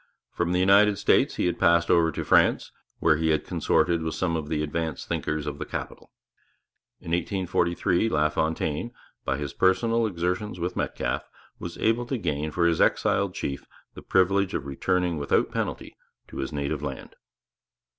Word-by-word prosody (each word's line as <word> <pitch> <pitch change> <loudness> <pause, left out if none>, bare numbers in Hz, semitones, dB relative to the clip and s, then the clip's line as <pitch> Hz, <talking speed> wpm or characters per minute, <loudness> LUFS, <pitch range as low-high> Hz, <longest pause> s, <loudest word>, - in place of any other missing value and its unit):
From 85 0 -1
the 90 - +1
United 100 +2 +5
States - - +2
he - - 0
had 90 - -1
passed 85 0 +4
over 85 -1 +4
to - - -4
France, - - +3 0.3
where 80 - +3
he 80 0 0
had 80 -1 +1
consorted 85 -1 +1
with 80 0 -3
some 85 -3 -1
of 75 -2 -4
the 75 -1 -1
advanced 80 0 -3
thinkers 75 -1 -2
of 75 -1 -5
the - - -2
capital. - - -7 0.9
In 85 - -8
1843 90 +2 0
LaFontaine, 80 +5 -1 0.3
by 65 -1 0
his 70 -1 -5
personal 115 +5 +2
exertions 90 +1 -2
with 90 +2 -3
Metcalfe, - - -2 0.3
was 85 0 -7
able 115 +2 +1
to 130 - -1
gain 75 -6 -2
for 85 +2 0
his 85 -1 +2
exiled - - +2
chief 70 - -4 0.3
the - - -10
privilege 95 +1 +2
of 70 - -3
returning 90 +4 -1
without 70 - +1
penalty - - -4 0.3
to - - -9
his 65 - -3
native 70 0 -3
land. 70 -2 -6
85 Hz, 165 wpm, -26 LUFS, 75-95 Hz, 0.9 s, United